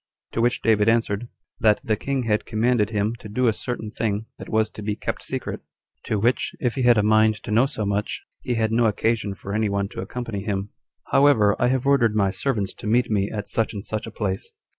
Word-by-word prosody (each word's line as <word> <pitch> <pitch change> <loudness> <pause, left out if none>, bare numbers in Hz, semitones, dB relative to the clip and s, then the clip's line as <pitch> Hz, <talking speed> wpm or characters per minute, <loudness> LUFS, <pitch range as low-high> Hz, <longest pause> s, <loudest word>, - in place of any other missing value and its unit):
To 115 - -1
which 120 +1 +1
David 110 -1 +4
answered, 115 -1 +1 0.3
That 105 -1 +4
the 110 - +1
king 135 +4 -2
had 105 -2 0
commanded 110 -1 +2
him 105 0 0
to 105 - -10
do 125 +4 +1
a 110 - +4
certain 110 -1 -5
thing 110 -1 -2
that - - -8
was 110 0 +2
to - - -9
be 105 0 -2
kept - - -4
secret, - - -4 0.4
to 110 - 0
which, 120 +5 +1
if 125 -3 0
he 135 - -2
had 120 -2 +5
a 105 - +3
mind 110 +1 +4
to - - -5
know 115 +5 +4
so 110 -6 -3
much, 100 +1 -2 0.2
he 125 - -2
had 110 -1 +1
no 115 0 +3
occasion 110 -1 0
for 100 +1 -7
any 110 0 +1
one 100 0 -1
to - - -6
accompany 115 -5 -5
him; 100 -1 -3 0.4
"however, 115 -8 +5
I 120 - +3
have 130 +1 0
ordered 125 -6 +3
my 100 -2 +2
servants 105 -5 -1
to - - -6
meet 120 +2 +2
me 100 -1 +1
at 105 -2 -5
such 115 -1 0
and 100 - -6
such 110 +1 -4
a - - -7
place." 100 -3 -3
110 Hz, 230 wpm, -24 LUFS, 105-120 Hz, 0.4 s, had